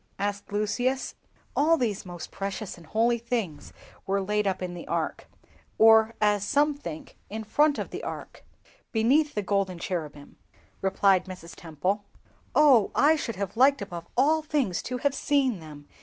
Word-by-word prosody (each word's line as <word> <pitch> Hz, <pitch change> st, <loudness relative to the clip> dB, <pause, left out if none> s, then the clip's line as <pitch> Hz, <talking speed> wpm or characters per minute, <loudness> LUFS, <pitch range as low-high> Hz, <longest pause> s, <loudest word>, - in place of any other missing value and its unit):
asked 200 Hz, 0 st, -3 dB
Lucius. 245 Hz, +6 st, -1 dB, 0.4 s
"All 325 Hz, +3 st, +4 dB
these 215 Hz, -8 st, -2 dB
most 175 Hz, -2 st, -8 dB
precious 195 Hz, +1 st, -5 dB
and 170 Hz, -3 st, -16 dB
holy 235 Hz, +2 st, +2 dB
things 225 Hz, -10 st, -3 dB, 0.4 s
were 195 Hz, +1 st, +1 dB
laid 210 Hz, +1 st, 0 dB
up 190 Hz, -1 st, 0 dB
in 180 Hz, -1 st, -4 dB
the 175 Hz, -, -8 dB
Ark -, -, -2 dB, 0.5 s
(or 220 Hz, 0 st, +6 dB
as 210 Hz, -2 st, +2 dB
some 290 Hz, +6 st, +2 dB
think 170 Hz, -, -9 dB
in 220 Hz, +2 st, -5 dB
front 290 Hz, +7 st, +2 dB
of -, -, -4 dB
the -, -, -6 dB
Ark), -, -, -7 dB, 0.5 s
beneath 270 Hz, +7 st, +2 dB
the 210 Hz, -, -1 dB
golden 195 Hz, -2 st, 0 dB
cherubim," 155 Hz, -5 st, -5 dB, 0.4 s
replied 195 Hz, -1 st, +3 dB
Mrs. 180 Hz, -3 st, -9 dB
Temple. 180 Hz, +6 st, -2 dB, 0.5 s
"Oh, 270 Hz, -9 st, +6 dB
I 305 Hz, +2 st, +5 dB
should 235 Hz, -7 st, -4 dB
have 200 Hz, 0 st, -4 dB
liked 275 Hz, +4 st, +4 dB
above 170 Hz, -1 st, -8 dB
all 305 Hz, +5 st, +4 dB
things 290 Hz, -, -1 dB
to 250 Hz, -, -2 dB
have 280 Hz, +2 st, 0 dB
seen 275 Hz, -8 st, +1 dB
them!" 150 Hz, -2 st, -12 dB
210 Hz, 160 wpm, -27 LUFS, 185-260 Hz, 0.5 s, or